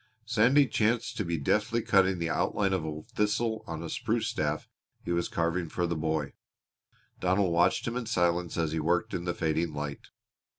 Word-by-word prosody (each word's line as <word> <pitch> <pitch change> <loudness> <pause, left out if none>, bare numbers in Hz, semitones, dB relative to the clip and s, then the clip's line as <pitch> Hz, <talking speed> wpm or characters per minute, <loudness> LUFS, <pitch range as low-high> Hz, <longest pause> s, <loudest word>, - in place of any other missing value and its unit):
Sandy 125 +5 +4
chanced 115 0 0
to 105 - 0
be 85 -2 -1
deftly 110 +9 +1
cutting 95 -1 +3
the 85 -1 -1
outline 100 +4 +1
of 95 -4 0
a 75 -1 -5
thistle 110 +2 0
on 80 0 -5
a - - -4
spruce 115 +5 -1
staff 75 0 -2 0.4
he - - -2
was 85 0 +1
carving 85 0 -1
for 90 - -1
the 85 0 -1
boy. 80 -2 -1 0.9
Donald 95 -1 +2
watched 85 +6 +2
him 120 - -2
in 125 -2 -3
silence 85 -4 +1
as 80 -2 0
he 80 - -1
worked 85 +3 0
in 85 - -3
the 85 -1 -1
fading 80 0 0
light. 75 -1 -5
85 Hz, 185 wpm, -29 LUFS, 80-105 Hz, 0.9 s, Sandy